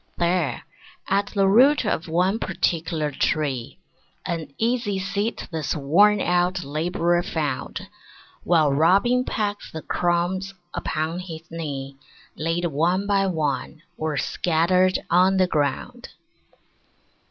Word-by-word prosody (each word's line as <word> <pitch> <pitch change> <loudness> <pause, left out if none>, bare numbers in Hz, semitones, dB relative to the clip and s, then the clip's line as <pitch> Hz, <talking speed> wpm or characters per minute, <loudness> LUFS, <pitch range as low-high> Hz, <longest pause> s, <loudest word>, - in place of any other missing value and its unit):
There, 175 -2 0 0.5
at 200 +1 +2
the 195 -2 +1
root 255 +7 +5
of 170 -5 -1
one 180 +6 +1
particular 165 -5 -1
tree, 140 -3 -1 0.5
An 165 -5 -4
easy 230 -3 0
seat 200 +4 -3
this 160 -2 -2
worn 190 +9 +4
out 180 +1 +1
Labourer 170 +4 0
found 150 -7 -3 0.6
While 155 -5 +3
Robin 195 - +3
pecked 205 -2 -3
the 160 - -6
crumbs 180 +3 -1 0.2
upon 160 +3 -2
his 165 -3 -8
knee 140 -4 -5 0.4
Laid 165 +2 -1
one 170 +5 +1
by 200 -1 +2
one, 155 -2 -2
or 155 -3 -2
scattered 180 +5 +2
on 185 +2 +4
the 185 - +4
ground. 145 - -2
175 Hz, 115 wpm, -23 LUFS, 155-190 Hz, 0.6 s, root